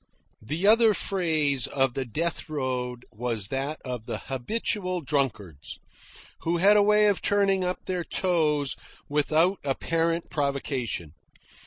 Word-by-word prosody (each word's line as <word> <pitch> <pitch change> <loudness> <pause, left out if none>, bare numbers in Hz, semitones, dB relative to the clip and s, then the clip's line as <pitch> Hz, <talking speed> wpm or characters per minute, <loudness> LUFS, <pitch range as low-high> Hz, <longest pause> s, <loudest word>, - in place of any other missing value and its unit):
The 155 - -3
other 220 0 +6
phase 155 - +1
of 135 -2 +1
the 135 0 -2
death 165 +8 -3
road 125 -4 -3
was 115 -3 -3
that 135 +3 -3
of 125 -3 -5
the - - -3
habitual 180 - -2
drunkards, 115 - -2 0.6
who 170 +1 0
had 200 +4 +5
a 210 - +6
way 210 +1 +4
of 205 -2 +2
turning 195 -2 +2
up 180 0 -3
their 180 -2 -2
toes 155 -7 +1 0.3
without 155 +6 +2
apparent 165 +4 -1
provocation. 135 - -2
150 Hz, 130 wpm, -26 LUFS, 130-180 Hz, 0.6 s, other